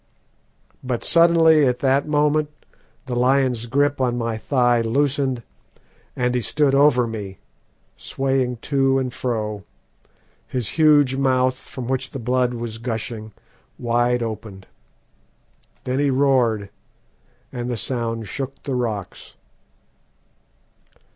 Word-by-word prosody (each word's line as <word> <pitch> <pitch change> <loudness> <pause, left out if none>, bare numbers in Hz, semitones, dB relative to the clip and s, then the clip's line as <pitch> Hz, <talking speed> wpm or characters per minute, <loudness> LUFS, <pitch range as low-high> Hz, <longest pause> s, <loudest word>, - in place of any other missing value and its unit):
But 125 -2 -3
suddenly, 165 -3 +5
at 125 0 0
that 135 +1 +1
moment, 150 0 +1 0.6
the 130 - -5
lion's 125 -2 +1
grip 140 +2 +1
on 120 -1 0
my 115 -1 -2
thigh 120 0 +2
loosened, 130 +1 0 0.7
and 125 0 0
he 125 - 0
stood 145 +4 +1
over 135 -3 +4
me, 105 -4 -6 0.6
swaying 130 - -1 0.2
to 135 -1 +3
and 130 -2 -2
fro, 105 -4 -3 0.8
his 125 -5 -3
huge 145 -4 +4
mouth, 130 -1 +2
from 130 -1 -8
which 130 0 -2
the - - -7
blood 125 +1 0
was 115 -1 -5
gushing, 115 -2 -5 0.5
wide 120 0 +1
opened. 105 -4 -7 1.2
Then 130 +1 -2
he 145 0 +2
roared, 125 -7 +1 0.8
and 120 0 -4
the 120 - -2
sound 115 -2 -2
shook 135 +4 -6
the 140 - -3
rocks. 110 -6 -4
125 Hz, 115 wpm, -21 LUFS, 115-135 Hz, 1.2 s, suddenly